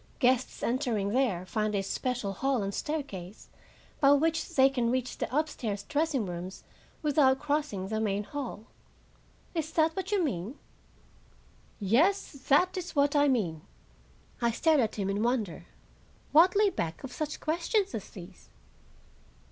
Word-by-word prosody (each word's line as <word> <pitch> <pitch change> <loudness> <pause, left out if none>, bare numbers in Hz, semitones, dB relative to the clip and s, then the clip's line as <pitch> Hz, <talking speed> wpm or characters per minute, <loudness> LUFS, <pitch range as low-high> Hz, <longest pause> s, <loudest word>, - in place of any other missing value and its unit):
Guests 255 -1 +1
entering 235 -5 0
there 210 -7 +1
find 215 +2 -1
a 195 - 0
special 235 0 -2
hall 265 +2 0
and 195 0 -3
staircase, 215 - -5 0.5
by 280 0 +6
which 320 +3 0
they 265 -1 +7
can 250 -4 0
reach 255 0 -2
the - - -1
upstairs 225 -10 -2
dressing 295 -5 0
rooms, 180 +1 -6 0.4
without 280 -3 +4
crossing 285 -9 -2
the 220 +2 -2
main 205 -2 0
hall. 250 -3 -6 0.9
Is 320 -2 -2
that 320 0 +2
what 380 +1 -4
you 400 -3 +2
mean?" 235 - -3 1.2
"Yes, 280 - +2 0.2
that 360 +7 +4
is 360 -2 -5
what 285 0 +3
I 290 0 +5
mean." 185 - 0 0.8
I 235 - +3
stared 310 +6 +3
at 225 -4 0
him 200 -3 -2
in 200 +1 -1
wonder. 230 -6 -1 0.6
What 345 +5 +6
lay 410 -1 +4
back 170 - -4
of 270 - -7
such 305 -1 -4
questions 355 +6 0
as 210 - -5
these? 180 -1 -12
260 Hz, 150 wpm, -29 LUFS, 205-305 Hz, 1.2 s, they